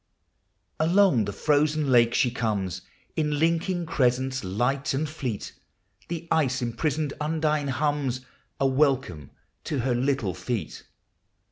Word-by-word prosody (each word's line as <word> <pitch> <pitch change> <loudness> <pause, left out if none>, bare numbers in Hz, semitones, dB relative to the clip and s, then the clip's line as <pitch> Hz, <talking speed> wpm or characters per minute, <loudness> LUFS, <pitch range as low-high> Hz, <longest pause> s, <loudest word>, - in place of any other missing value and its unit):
Along 165 - +4
the 100 - -3
frozen 150 +4 +1
lake 120 -1 +5
she 125 - +3
comes 100 -6 -2 0.3
In 150 -2 0
linking 170 +3 +1
crescents, 130 -4 +1
light 125 +9 0
and 155 +3 -1
fleet; 135 -8 -5 0.5
The 170 0 -5
ice 135 -5 +2
imprisoned 140 +5 -1
L^ndine 155 -2 0
hums 140 -2 0 0.4
A 135 - +2
welcome 130 - +1 0.4
to 145 -5 -1
her 125 +1 +1
little 125 -5 0
feet. 105 - -4
135 Hz, 120 wpm, -26 LUFS, 120-155 Hz, 0.5 s, lake